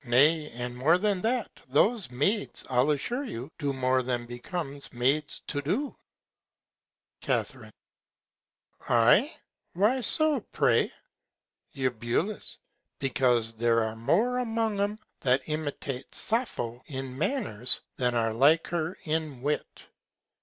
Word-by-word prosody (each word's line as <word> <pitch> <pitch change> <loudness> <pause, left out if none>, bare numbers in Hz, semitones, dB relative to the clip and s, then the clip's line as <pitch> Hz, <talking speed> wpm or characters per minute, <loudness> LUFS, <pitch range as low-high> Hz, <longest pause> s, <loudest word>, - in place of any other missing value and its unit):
Nay, 150 +5 +3
and 120 +1 -4
more 150 +8 +4
than 200 -1 0
that, 235 +1 0 0.2
those 190 - +2
Maids, 170 - -1
I'll 130 +3 +2
assure 235 - -1
you, 150 - -6
do 145 -3 0
more 130 -1 +1
than 120 -1 -2
becomes 140 +4 -5
Maids 140 +5 0
to 145 - -2
do. 205 - -2 1.3
Ca. - - +1 1.4
Ay! - - +5 0.4
why 215 +9 +2
so, 310 +4 +4
pray? - - +3 0.8
Eu. 130 -2 0 1.1
Because 125 -4 +1
there 115 0 +2
are 110 0 -3
more 205 - +1
among 225 -3 -1
'em 205 +1 0 0.2
that 130 0 +1
imitate 145 -4 -4
Sappho 130 - 0
in 130 -2 -5
Manners, 145 - +1 0.2
than 125 -1 +1
are 115 -1 +1
like 145 +8 +4
her 170 0 -2
in 155 -5 -3
Wit. 150 +1 -3
145 Hz, 120 wpm, -28 LUFS, 125-200 Hz, 1.4 s, Ay